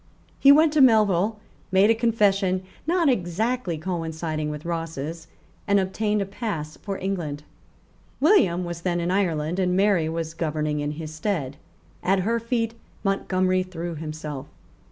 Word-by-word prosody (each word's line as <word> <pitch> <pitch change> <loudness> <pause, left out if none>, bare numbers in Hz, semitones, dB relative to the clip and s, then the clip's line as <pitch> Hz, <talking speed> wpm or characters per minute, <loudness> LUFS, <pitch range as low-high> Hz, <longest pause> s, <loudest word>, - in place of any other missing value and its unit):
He 275 - +8
went 305 +1 +5
to 305 - +4
Melville, 215 -4 +4 0.3
made 195 +3 +5
a - - +6
confession 200 -5 +2 0.2
not 340 -1 +2
exactly 215 - 0
coinciding 160 -2 -3
with 150 +1 -6
Ross's, 165 -1 -4 0.4
and 200 0 +4
obtained 210 +2 0
a - - -5
pass 195 -7 -4
for 195 -2 -5
England. 170 -7 -3 0.8
William 200 - +4
was 170 -1 -5
then 175 -1 0
in 170 +1 -1
Ireland; 175 -3 0
and 180 -1 +1
Mary 195 -5 +3
was 165 0 -3
governing 155 -2 -1
in 145 0 -2
his 155 0 -7
stead. 155 -5 -2 0.5
At 190 +1 +2
her 230 +5 0
feet 230 -1 -1 0.3
Montgomery 185 -2 +1
threw 175 -2 -5
himself. 155 -3 -6
185 Hz, 145 wpm, -24 LUFS, 160-210 Hz, 0.8 s, He